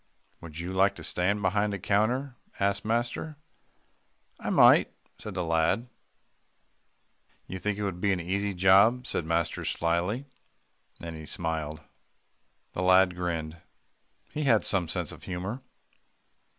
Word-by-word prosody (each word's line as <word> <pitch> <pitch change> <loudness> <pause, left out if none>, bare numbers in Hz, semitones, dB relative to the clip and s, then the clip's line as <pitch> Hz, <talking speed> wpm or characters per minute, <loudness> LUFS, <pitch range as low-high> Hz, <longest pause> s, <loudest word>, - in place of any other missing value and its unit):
"Would 80 -2 -10
you 85 +2 -4
like 100 +1 +3
to 80 - -10
stand 95 +5 0
behind 105 +2 +1
a - - -4
counter?" 120 +8 0 0.2
asked 100 0 0
master. 120 +7 -2 1.0
"I - - -4
might," - - +6 0.3
said 105 -3 -7
the 90 - -1
lad. 85 +8 +1 1.6
"You 95 - -6
think 105 +2 -2
it 105 - -3
would 90 -3 -3
be 100 - +2
an 95 - 0
easy 100 +3 -2
job?" 100 +7 +5
said 80 - -3
master 85 0 0
slyly. 85 +10 0 0.7
Then 85 -1 -7
he 80 -1 -9
smiled. 80 -2 -3 0.9
The - - -3
lad 95 0 +5
grinned. 85 -2 -3 0.7
He 150 -1 -3
had 115 -5 +4
some 90 -4 +1
sense - - -3
of - - -12
humour. 95 +8 -4
95 Hz, 135 wpm, -28 LUFS, 85-105 Hz, 1.6 s, might